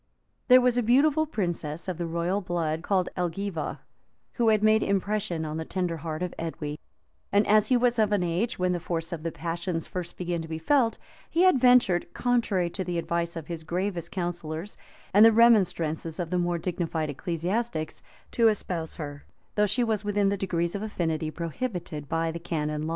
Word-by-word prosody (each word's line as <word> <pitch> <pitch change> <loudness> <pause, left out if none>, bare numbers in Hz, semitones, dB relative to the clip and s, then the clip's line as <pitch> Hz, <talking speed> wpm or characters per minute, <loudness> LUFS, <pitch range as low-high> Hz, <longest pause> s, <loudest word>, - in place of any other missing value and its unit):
There 255 0 +8
was 245 -1 +3
a - - +3
beautiful 285 +7 +3
princess 175 - -3
of 180 -2 -3
the 170 - -2
royal 170 +4 -1
blood, 165 -3 -2
called 185 0 +1
Elgiva, 180 -2 -3 0.5
who 235 -2 +1
had 215 -1 +3
made 215 0 +5
impression 200 -4 -1
on 155 0 -4
the 160 - -2
tender 175 -1 -2
heart 160 +2 -4
of 180 - -3
Edwy; 150 -2 -4 0.5
and 205 +1 +4
as 215 0 +4
he 255 - +4
was 240 -1 +2
of 215 -1 +3
an 205 -3 +2
age 175 +8 -1
when 180 0 +1
the 175 - -1
force 165 0 -3
of 165 - -5
the 165 +1 -3
passions 170 0 -3
first 180 -2 -6
begins 175 -2 -2
to 165 - -7
be 160 0 -4
felt, 230 - +2 0.3
he 340 - +2
had 370 -8 +5
ventured, 245 -9 +4
contrary 230 -7 +1
to 190 - -3
the 175 -1 -3
advice 170 0 -1
of 165 -2 -6
his 165 0 -6
gravest 175 +1 -2
counsellors, 175 0 -4 0.4
and 205 +2 +8
the 225 - +9
remonstrances 180 -8 +3
of 170 -1 -3
the 180 - +1
more 175 0 0
dignified 165 -3 -2
ecclesiastics,[] 175 - -3 0.3
to 230 -1 +4
espouse 180 -6 -1
her; 145 -2 -7 0.3
though 210 0 +3
she 240 +5 +1
was 220 -3 0
within 205 -1 +1
the 200 - +1
degrees 175 -3 -1
of 200 - -3
affinity 160 -7 -2
prohibited 170 - -5
by 165 0 0
the 170 - -6
canon 155 -2 -2
law. - - -3
175 Hz, 195 wpm, -27 LUFS, 165-210 Hz, 0.5 s, the